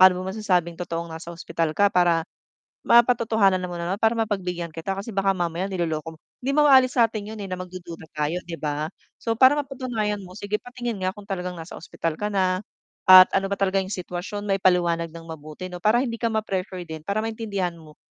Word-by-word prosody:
Paano 185 -1 +8
mo 190 - -3
masasabing 180 -5 0
totoong 170 -1 -4
nasa 160 +1 -8
ospital 165 -2 -3
ka 200 -1 +4
para 170 -2 +3 0.6
mapatotohanan 220 -6 +4
mo 175 -1 -5
naman, 175 +3 -1
para 225 +2 +3
mapagbigyan 190 -6 -2
kita 165 +4 -4
kasi 195 +3 -5
baka 195 -1 +2
mamaya 175 0 -2
niloloko 165 -4 -3
mo 155 - -19 0.3
hindi 275 - +1
mo 300 -1 +5
aalis 260 -2 +6
sa 230 - +6
atin 215 -1 -6
'yon, 215 - -8
eh, 195 - -5
na 185 - -3
magdududa 180 -2 -8
tayo, 150 +2 -1
'di 165 -1 -7
ba? 150 +1 -2 0.2
So 230 - -2
para 260 +5 +6
mapatunayan 245 -7 -2
mo, 185 -1 -11
sige, 210 0 -2
patingin 240 -4 -5
nga 185 +1 -1
kung 205 - -10
talagang 180 -3 -4
nasa 165 +1 -9
ospital 165 0 -4
ka 210 - 0
na 185 -2 +1 0.5
at 185 0 +10
ano 195 0 +1
ba 200 - -1
talaga 195 0 +1
'yong 190 - -5
sitwasyon, 180 +3 -5
maipaliwanag 180 -4 +2
nang 165 0 -11
mabuti 160 +3 -8
'no, 180 - -6
para 235 +7 +3
hindi 230 -2 -4
ka 230 - +1
ma-pressure 190 -4 -3
din, 160 -1 -7
para 200 +7 -2
maintindihan 210 -5 -2
mo 155 -2 -15
185 Hz, 205 wpm, -24 LUFS, 170-210 Hz, 0.6 s, at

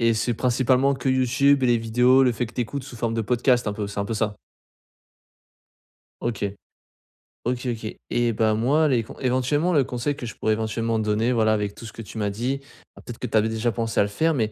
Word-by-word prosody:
et 115 0 +4
c'est 115 +2 0
principalement 130 +3 +2
que 135 0 -3
YouTube 130 +2 +3
et - - +4
les 120 -1 +3
vidéos, 125 +4 +4
le 125 - +3
fait 120 - -2
que 115 - -14
tu - - -2
écoutes 140 +4 -5
sous 130 -4 -10
forme 115 0 -1
de 115 - 0
podcast 120 +1 +2
un - - -1
peu, 105 -1 -4
c'est 100 0 -4
un 100 - -1
peu 115 - -4
ça? 105 -1 -1 1.9
OK. 115 -3 -2 1.0
OK, 125 +1 -2
OK. 110 -1 -6 0.2
Eh 120 -1 +2
bah 110 0 +2
moi, 140 +8 +2
les 120 -5 +2
con - - -11
éventuellement, 135 +7 +1
le 140 -3 +4
conseil 125 +4 -2
que 125 - -7
je 110 - -7
pourrais 110 - +1
éventuellement 110 +1 -1
donner, 110 +3 +1
voilà, 110 -2 +3
avec 105 -1 -2
tout 115 - -10
ce 110 - -8
que 115 - -8
tu 110 - -10
m'as 105 -1 0
dit- 125 +7 -2 0.3
alors - - -14
peut-être 120 - -8
que 125 - -3
tu 110 - +1
avais 110 +1 +2
déjà 115 +1 0
pensé 115 +2 -2
à - - +6
le 100 - -2
faire 160 +10 +1
mais, 110 -5 0
120 Hz, 240 wpm, -24 LUFS, 110-130 Hz, 1.9 s, à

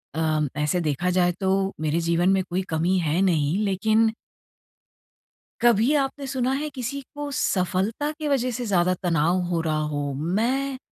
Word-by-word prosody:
अ, 155 -1 +1 0.2
ऐसे 150 +4 +1
देखा 155 +3 0
जाए 175 -1 +4
तो 195 +1 +1
मेरे 155 +2 0
जीवन 170 +2 +2
में 190 -1 +2
कोई 180 +2 0
कमी 170 +4 +1
है 165 +2 0
नहीं 165 -3 +2
लेकिन 220 +3 +2 1.5
कभी 235 +2 +4
आपने 275 +1 -3
सुना 260 -1 -1
है 305 +1 -3
किसी 265 +2 -4
को 290 0 -5
सफलता 195 +9 0
की 305 - -2
वज़ह 255 -3 +1
से 245 - -3
ज़्यादा 185 -2 +2
तनाव 170 +1 +2
हो 170 -2 0
रहा 155 -2 0
हो? 145 -1 -2
मैं 235 - -1
185 Hz, 160 wpm, -24 LUFS, 165-240 Hz, 1.5 s, जाए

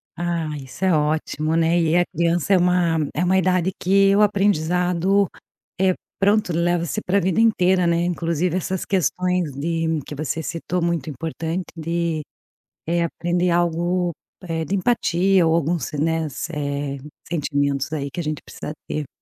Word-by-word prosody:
Ah, 170 -2 -2
isso 135 +8 -5
é 185 - +4
ótimo, 155 +1 0
né? 165 +1 +3
E 165 0 +2
é 175 - +5
a - - +1
criança 170 +3 +1
é - - +6
uma 175 -2 +2 0.2
é 170 - +1
uma 185 +1 +2
idade 185 0 +2
que 195 +1 +4
o 210 - +4
aprendizado 190 -1 +2 0.5
é 185 -1 +3 0.2
pronto, 200 -2 +2
leva-se 170 +3 0
para 195 +1 +1
a - - +5
vida 185 +3 +2
inteira, 185 -5 +3
né? 170 0 +2
Inclusive 170 0 -1
essas 185 0 -2
questões 180 -2 0
de 160 +2 -1
que - - -7
você 155 +2 -3
citou, 170 +2 -3
muito 170 -4 -1
importante 165 +4 -4
de, 165 0 -1 0.6
eh, 170 +1 +1
aprender 175 +2 -1
algo, 175 +1 +1 0.3
eh, 165 -2 -2
de 190 - -2
empatia 190 -3 +2
ou 160 - +3
alguns, 170 0 -1
né, 160 +2 0 0.3
eh, 140 -1 -3 0.3
sentimentos 145 -3 -1
aí 140 -3 -3
que - - -6
a - - -1
gente 155 -1 -3
precisa 150 - -7
ter. 150 -2 -3
170 Hz, 160 wpm, -22 LUFS, 160-180 Hz, 0.6 s, é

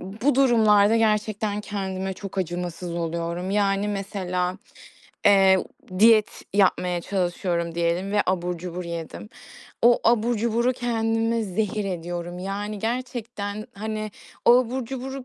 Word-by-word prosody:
bu 225 +9 -1
durumlarda 220 -5 +5
gerçekten 215 -1 0
kendime 190 -2 -4
çok 195 +1 -7
acımasız 175 -1 -3
oluyorum. 170 +2 -3
Yani, 200 0 +1
mesela, 185 -3 -2 0.7
eee, 195 -2 +6
u 185 0 -9
diyet 220 -1 +5
yapmaya 180 -3 +2
çalışıyorum 175 -2 -2
diyelim 170 +4 0
ve 205 - +3
abur 180 -1 -1
cubur 180 +1 -6
yedim. 170 +4 -6 0.5
O 240 +1 +6
abur 235 0 +3
cuburu 235 +3 +1
kendime 225 -1 0
zehir 210 +1 -2
ediyorum. 175 -1 -4
Yani, 205 +3 -4
gerçekten, 225 -3 -4
hani, 215 +1 -4 0.3
o 240 +1 +7
abur 255 0 -2
cuburu 265 +1 -6
200 Hz, 120 wpm, -24 LUFS, 180-225 Hz, 0.7 s, o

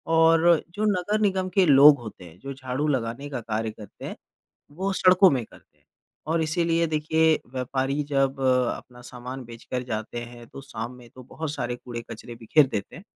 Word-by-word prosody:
और 165 0 +5 0.3
जो 210 +1 0
नगर 210 +4 -1
निगम 190 -2 +1
के 190 -2 +5
लोग 145 -1 +8
होते 105 -5 -10
हैं 85 +1 -15
जो 140 0 -7
झाड़ू 135 +2 -3
लगाने 130 0 -2
का 135 -4 -4
कार्य 110 0 -2
करते 105 -2 -12
हैं - - -6 0.6
वो 195 +2 -1
सड़कों 185 +1 +7
में 130 -3 0
करते - - -21
हैं। - - -36 0.4
और 165 +1 +1
इसलिए 165 +1 +1
देखिए, 160 +1 +2
व्यापारी 135 +2 -1
जब 135 0 +1
अ, 125 -2 +3
अपना 125 0 -15
सामान 125 +2 -7
बेचकर 120 +2 -6
जाते 110 +2 -4
हैं 120 -1 -12
तो 135 - -10
शाम 120 -2 -6
में 120 -1 -15
तो 130 +2 -13
बहुत 155 +4 -5
सारे 125 -4 -3
कूड़े-कचरे 120 -1 -8
बिखेर 125 +5 +3
देते 100 -6 -5
हैं। 180 - -11
135 Hz, 185 wpm, -25 LUFS, 120-160 Hz, 0.6 s, लोग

